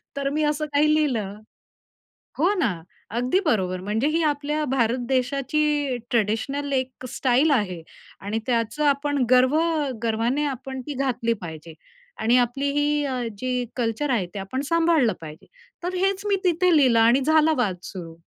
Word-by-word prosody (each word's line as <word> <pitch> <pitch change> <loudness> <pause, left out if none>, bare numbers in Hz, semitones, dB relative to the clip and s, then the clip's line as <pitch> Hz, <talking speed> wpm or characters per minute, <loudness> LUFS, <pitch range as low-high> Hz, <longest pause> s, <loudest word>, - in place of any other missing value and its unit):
तर 280 0 -1
मी 305 +2 -1
असं 300 0 0
काही 305 +1 +4
लिहिलं. 225 -10 0 1.0
हो 355 +8 +3
ना, 235 - +2 0.4
अगदी 250 - +1
बरोबर. 185 - 0
म्हणजे 215 +7 0
ही 330 - +2
आपल्या 300 0 0
भारत 245 -1 +1
देशाची 275 +1 0
ट्रेडिशनल 240 +6 -1
एक 260 -1 -3
स्टाईल 260 +5 +2
आहे 195 -10 0 0.4
आणि 210 +3 -3
त्याचं 235 +3 -1
आपण 285 -1 +1
गर्व 255 +3 +5 0.5
गर्वाने 230 +6 0
आपण 265 -1 -5
ती 295 - -3
घातली 250 -4 0
पाहिजे 160 -1 -8 0.5
आणि 235 +3 +4
आपली 250 +3 +1
ही 295 0 +1
अ, 255 -2 -2 0.2
जी 250 +1 -2
कल्चर 240 +4 -1
आहे 225 -8 +1
ते 200 - -5
आपण 225 +8 -4
सांभाळलं 330 - +3
पाहिजे. 155 -1 -10 0.4
तर 360 +1 -3
हेच 390 +2 0
मी 400 - +3
तिथे 360 -1 +3
लिहिलं 250 -5 +4
आणि 235 +4 +5
झाला 315 0 +4
वाद 210 -7 +1
सुरू. 170 -4 -8
260 Hz, 155 wpm, -24 LUFS, 230-295 Hz, 1.0 s, गर्व